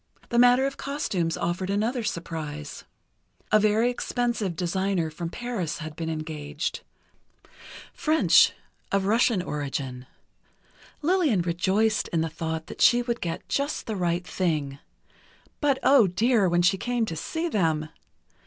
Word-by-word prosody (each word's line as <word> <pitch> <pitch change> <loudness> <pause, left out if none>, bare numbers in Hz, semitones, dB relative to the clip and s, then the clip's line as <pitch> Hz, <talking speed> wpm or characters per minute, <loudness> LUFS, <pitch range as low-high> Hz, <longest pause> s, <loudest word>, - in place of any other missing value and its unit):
The 235 - +2
matter 245 +2 +6
of 275 - -3
costumes 195 - -2
offered 175 +2 -2
another 225 +5 0
surprise: 155 -6 -5 0.7
A 215 - +6
very 215 +3 +3
expensive 240 -6 -2
designer 185 -1 -1
from 165 +2 -5
Paris 205 -7 -4
had 155 -2 -7
been 165 0 -4
engaged—French, 155 - -1 0.4
of 195 -1 +1
Russian 220 -2 +2
origin—Lillian 150 - -3
rejoiced 190 +5 +1
in 165 - 0
the 165 - -1
thought 160 0 -4
that - - -9
she 245 0 +6
would 235 -1 -3
get 165 -1 -4
just 280 +2 -1
the 220 - -3
right 175 -1 -1
thing. 150 -8 -2 0.8
But, 285 -3 +2
oh 265 -7 +6
dear, 205 +2 +2
when 175 0 +2
she 195 +2 +3
came 245 0 0
to 165 - -5
see 320 - -3
them! 160 - 0
185 Hz, 130 wpm, -26 LUFS, 165-240 Hz, 0.8 s, matter